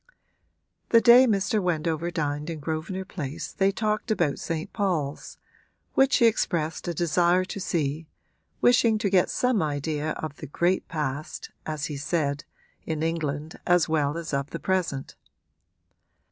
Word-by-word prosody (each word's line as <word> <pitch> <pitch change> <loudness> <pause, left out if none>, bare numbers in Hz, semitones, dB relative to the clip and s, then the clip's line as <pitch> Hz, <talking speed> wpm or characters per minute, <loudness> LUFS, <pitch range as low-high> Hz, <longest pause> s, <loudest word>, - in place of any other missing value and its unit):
The 230 - +7
day 245 +2 +7
Mr. 205 -1 +1
Wendover 165 -2 -1
dined 150 -2 -2
in 165 -2 -4
Grosvenor 160 +5 -4
Place 150 -7 -6
they 195 0 +2
talked 215 +3 -1
about 170 -10 +1
St. 165 -1 -4
Paul's, 165 -9 -2 0.6
which 270 0 +4
he 235 - +4
expressed 165 -9 0
a 175 - -1
desire 175 +2 +2
to 200 - -6
see, 155 -3 -2 0.5
wishing 235 -2 +4
to 205 -2 -1
get 185 -3 +4
some 250 -5 +1
idea 150 +1 -2
of 155 -2 -6
the 150 - -8
great 175 +6 0
past, 150 -2 -4 0.2
as 155 -2 -2
he 150 -3 -4
said, 145 -1 -1 0.4
in 160 -1 -3
England 155 -2 -3
as 175 -1 +4
well 150 -1 0
as 165 -2 -5
of 140 +1 -1
the - - -5
present. 175 -8 -1
165 Hz, 145 wpm, -26 LUFS, 150-190 Hz, 0.6 s, The